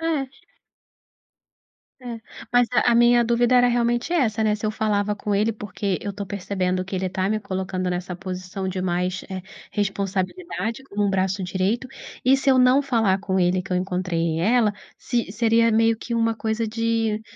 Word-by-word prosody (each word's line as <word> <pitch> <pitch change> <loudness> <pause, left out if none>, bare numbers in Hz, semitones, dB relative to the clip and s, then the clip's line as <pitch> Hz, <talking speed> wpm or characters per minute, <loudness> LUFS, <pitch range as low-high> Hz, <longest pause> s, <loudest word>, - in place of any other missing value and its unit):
É. 320 -5 0 1.8
É. 235 -2 -6 0.3
Mas 245 -1 +4
a 235 0 +4
minha 240 0 +5
dúvida 240 +2 +3
era 245 0 +6
realmente 240 +4 +1
essa, 225 -10 +1
né, 210 -1 +2
se 215 - -5
eu 215 - 0
falava 210 -1 0
com 205 0 -3
ele, 210 +2 +2
porque 200 -2 -3
eu 205 - -4
estou 200 +1 -5
percebendo 185 -1 -2
que 190 +1 -5
ele 185 +1 -1
está 185 +1 -1
me 215 0 0
colocando 185 -2 -3
nessa 180 0 -3
posição 185 +1 -5
de 185 0 -3
mais, 180 +1 -1
eh, 190 -1 -5 0.3
responsabilidade, 205 - -2
como 205 -4 -1
um - - +1
braço 190 0 0
direito, 190 +8 -1 0.4
e 260 +1 +6
se 270 0 0
eu 260 - +5
não 255 +2 +5
falar 225 -8 +1
com 190 -1 -1
ele 180 +1 +2
que 190 - -11
eu 180 - +2
encontrei 180 -3 -1
ela, 215 +2 +3 0.2
se 235 -6 -2
seria 230 +1 +3
meio 225 +1 +3
que 235 - -5
uma 230 0 +1
coisa 220 0 -2
de 225 -1 0
210 Hz, 180 wpm, -23 LUFS, 190-235 Hz, 1.8 s, era